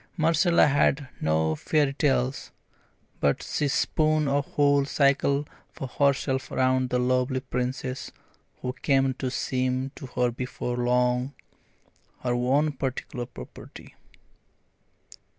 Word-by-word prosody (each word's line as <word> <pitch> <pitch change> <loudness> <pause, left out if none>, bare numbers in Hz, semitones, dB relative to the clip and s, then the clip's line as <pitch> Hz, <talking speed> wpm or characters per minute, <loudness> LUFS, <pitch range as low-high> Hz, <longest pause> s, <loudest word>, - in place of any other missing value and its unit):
Marcella 165 +2 +4
had 140 -1 +2
no 80 0 +1
fairy 145 - +1
tales, 135 -2 0 0.7
but 70 -1 +1
she 150 - -1
spun 155 +1 +1
a 140 +1 +2
whole 145 0 +2
cycle 140 0 +2 0.2
for - - -7
herself 135 0 0
around 130 0 +2
the 125 - +1
lovely 125 +1 +1
Princess 130 0 -4 0.5
who 125 0 -2
came 135 -1 +1
to 130 0 -3
seem 130 +1 -1
to 135 - -8
her 125 -1 0
before 125 0 -4
long 125 +2 +1 0.9
her 125 -1 0
own 135 +5 +2
particular 130 -2 -4
property. 65 - -12
130 Hz, 115 wpm, -26 LUFS, 125-140 Hz, 0.9 s, Marcella